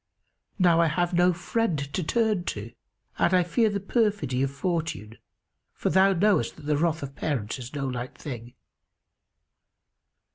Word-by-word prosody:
Now 175 Hz, -4 st, +4 dB
I 165 Hz, -, +4 dB
have 175 Hz, +3 st, 0 dB
no 175 Hz, +1 st, +4 dB
friend 180 Hz, +1 st, -1 dB
to 140 Hz, +5 st, -3 dB
turn 215 Hz, 0 st, +1 dB
to 110 Hz, -3 st, -5 dB, 0.5 s
and 180 Hz, -, +3 dB
I 180 Hz, -, +4 dB
fear 220 Hz, +6 st, +2 dB
the 200 Hz, -1 st, -2 dB
perfidy 200 Hz, -, 0 dB
of 135 Hz, -, +1 dB
Fortune, 140 Hz, -, -3 dB, 0.5 s
for -, -, -1 dB
thou 190 Hz, +1 st, +5 dB
knowest 190 Hz, -, +2 dB
that 155 Hz, -, -14 dB
the 150 Hz, 0 st, +1 dB
wrath 160 Hz, -1 st, 0 dB
of 140 Hz, 0 st, -7 dB
parents 130 Hz, -7 st, -2 dB
is 125 Hz, +3 st, -8 dB
no 140 Hz, -1 st, -2 dB
light 125 Hz, -1 st, -5 dB
thing. 120 Hz, -3 st, -8 dB
165 Hz, 155 wpm, -26 LUFS, 135-185 Hz, 0.5 s, thou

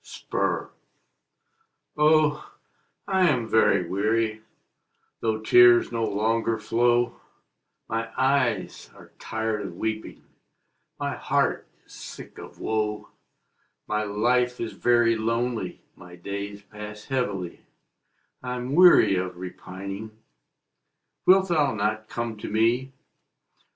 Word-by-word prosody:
APPEAL. -, -, -3 dB, 1.2 s
Oh, 150 Hz, 0 st, +2 dB, 0.5 s
I 190 Hz, -2 st, +3 dB
am 125 Hz, -6 st, 0 dB
very 110 Hz, 0 st, +3 dB
weary, 110 Hz, +2 st, 0 dB, 0.8 s
Though 110 Hz, -1 st, -1 dB
tears 120 Hz, +2 st, +6 dB
no 115 Hz, -1 st, -1 dB
longer 110 Hz, +2 st, 0 dB
flow; 120 Hz, +3 st, +1 dB, 0.7 s
My 115 Hz, 0 st, -3 dB
eyes 130 Hz, -4 st, 0 dB
are -, -, -16 dB
tired 110 Hz, -1 st, -3 dB
of 95 Hz, -4 st, -7 dB
weeping, 110 Hz, +1 st, -4 dB, 0.8 s
My -, -, -2 dB
heart -, -, 0 dB, 0.2 s
is -, -, -18 dB
sick -, -, -10 dB
of -, -, -11 dB
woe; 105 Hz, -1 st, -2 dB, 0.8 s
My 105 Hz, 0 st, 0 dB
life 120 Hz, +4 st, +1 dB
is 115 Hz, -, -4 dB
very 120 Hz, -1 st, +3 dB
lonely 115 Hz, -3 st, -2 dB
My 90 Hz, 0 st, -13 dB
days 100 Hz, +3 st, -6 dB
pass 105 Hz, +1 st, -10 dB
heavily, 100 Hz, -10 st, -3 dB, 0.8 s
I'm 125 Hz, +1 st, -4 dB
weary 175 Hz, -, +7 dB
of 90 Hz, -1 st, -3 dB
repining; 95 Hz, +4 st, -8 dB, 1.1 s
Wilt 190 Hz, 0 st, +6 dB
thou 150 Hz, -8 st, +2 dB
not 105 Hz, +1 st, -2 dB
come 115 Hz, -2 st, -4 dB
to -, -, -7 dB
me? 115 Hz, +5 st, +1 dB
110 Hz, 105 wpm, -25 LUFS, 105-125 Hz, 1.2 s, weary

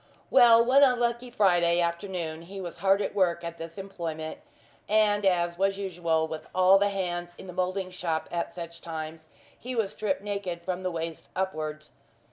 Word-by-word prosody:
Well, 235 Hz, -3 st, +7 dB
one 265 Hz, +3 st, +5 dB
unlucky 245 Hz, -2 st, +2 dB
Friday 175 Hz, -7 st, +3 dB
afternoon 170 Hz, -2 st, -2 dB
he 190 Hz, +4 st, -9 dB
was 175 Hz, -2 st, -7 dB
hard 195 Hz, +2 st, +3 dB
at -, -, -3 dB
work 175 Hz, -3 st, +1 dB
at 170 Hz, 0 st, -6 dB
this 165 Hz, +3 st, -8 dB
employment, 165 Hz, -5 st, -5 dB, 0.5 s
and 210 Hz, -1 st, +3 dB
as 175 Hz, -1 st, +1 dB
was 195 Hz, 0 st, +2 dB
usual 170 Hz, -5 st, 0 dB
with 155 Hz, -1 st, -7 dB
all 185 Hz, +1 st, +6 dB
the 205 Hz, 0 st, +3 dB
hands 175 Hz, -3 st, -3 dB
in -, -, -10 dB
the 180 Hz, -, -8 dB
moulding 185 Hz, +1 st, -2 dB
shop 165 Hz, -3 st, -2 dB
at 170 Hz, -1 st, -2 dB
such 170 Hz, -1 st, -8 dB
times, 160 Hz, -1 st, -6 dB, 0.3 s
he 250 Hz, +1 st, -6 dB
was 220 Hz, -4 st, 0 dB
stripped 200 Hz, -2 st, -2 dB
naked 200 Hz, -4 st, -4 dB
from 185 Hz, 0 st, -3 dB
the 185 Hz, -, -1 dB
waist 165 Hz, -1 st, -5 dB
upwards. 155 Hz, -5 st, -3 dB
180 Hz, 175 wpm, -28 LUFS, 170-200 Hz, 0.5 s, Well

